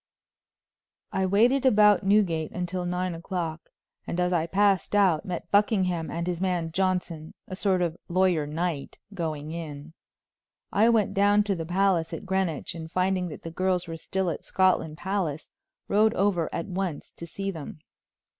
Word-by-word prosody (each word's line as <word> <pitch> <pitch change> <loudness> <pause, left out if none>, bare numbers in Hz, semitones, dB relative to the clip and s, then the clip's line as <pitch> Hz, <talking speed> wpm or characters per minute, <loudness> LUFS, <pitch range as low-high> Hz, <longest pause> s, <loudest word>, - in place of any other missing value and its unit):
I 190 0 0
waited 240 +8 +3
about 210 -5 +5
Newgate 190 -6 +2
until 180 0 -3
nine 180 0 -1
o'clock, 165 -1 -5 0.4
and 175 - -3
as 180 0 +1
I 165 -1 +1
passed 200 +1 +2
out 190 -6 +3
met 175 -2 -5
Buckingham 185 -6 +2
and 170 +3 -3
his 175 -1 -3
man 175 -3 -1
Johnson, 180 -3 -2
a 185 - -6
sort 185 -2 +1
of 170 -2 -1
lawyer 175 -4 +2
knight, 160 -1 -3 0.2
going 155 -4 -4
in. 160 -2 -7 0.8
I 215 +3 +4
went 215 -4 +2
down 205 +1 +4
to 200 -1 -1
the 165 -2 -5
palace 180 -2 +1
at - - -6
Greenwich, 190 -5 -1
and 160 -1 -8
finding 185 0 +1
that 155 - -9
the 165 - -6
girls 185 0 0
were 165 - -5
still 185 +2 -2
at - - -6
Scotland 185 -5 +1
Palace, 180 -6 -3 0.4
rode 215 +2 +3
over 185 -4 +1
at 165 - -3
once 185 -5 -4
to 170 - -7
see 195 +4 -4
them. 160 -5 -8
180 Hz, 165 wpm, -26 LUFS, 165-195 Hz, 0.8 s, about